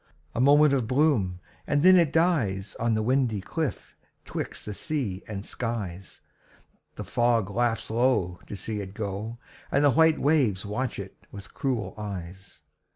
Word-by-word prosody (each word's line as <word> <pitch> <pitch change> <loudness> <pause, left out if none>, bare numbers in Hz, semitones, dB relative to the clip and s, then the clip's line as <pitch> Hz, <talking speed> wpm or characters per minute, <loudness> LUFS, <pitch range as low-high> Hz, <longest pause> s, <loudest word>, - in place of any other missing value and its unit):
A 120 - 0
moment 145 +2 +6
of 130 -5 +1
bloom, 125 - +2 0.3
and 145 +1 +1
then 185 +1 +8
it 170 -5 +4
dies 125 - +1
On 115 -1 +1
the 110 - 0
windy 125 -3 +1
cliff 155 - -4 0.3
'twixt - - -5
the 105 - -5
sea 120 - -3
and 100 -1 -6
skies. 100 -6 -5 0.7
The - - -5
fog 115 -4 +1
laughs 115 -1 0
low 110 -7 +1
to - - -6
see 105 +2 -4
it 95 0 -8
go, 105 +2 -4 0.3
And 140 - +3
the 145 - +6
white 160 +4 +4
waves 130 -11 +2
watch 110 +6 -3
it 100 -1 -9
with 100 -1 -10
cruel 115 -8 -2
eyes. 95 -5 -8
115 Hz, 155 wpm, -27 LUFS, 100-140 Hz, 0.7 s, then